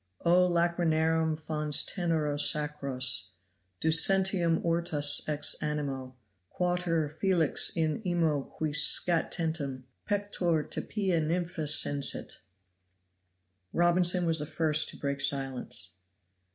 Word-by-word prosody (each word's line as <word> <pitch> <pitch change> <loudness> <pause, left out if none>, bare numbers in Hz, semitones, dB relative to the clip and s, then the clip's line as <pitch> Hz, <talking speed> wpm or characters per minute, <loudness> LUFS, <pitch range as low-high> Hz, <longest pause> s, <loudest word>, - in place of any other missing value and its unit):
O 180 +1 +3
lacryrnarum 160 -2 0
fons 150 -1 +1
tenero 160 -5 -2
sacros 140 -4 0 0.5
Ducentium 175 +1 +3
ortus 165 -4 +1
ex 150 0 0
animo; 140 -4 -5 0.3
quater 175 -3 -2
Felix 165 +1 +1
in 160 +2 -2
imo 165 -6 0
qui 155 +2 -5
scatentem 155 -3 +1 0.3
Pectore 195 -6 -1
te - - -3
pia 190 -6 -2
Nynmpha 165 0 -3
sensit. 145 -1 +1 1.3
Robinson 175 +1 +2
was 165 -1 0
the 150 - -5
first 155 -1 +1
to - - -11
break 140 -1 -4
silence. 135 -9 +1
160 Hz, 100 wpm, -28 LUFS, 150-175 Hz, 1.3 s, O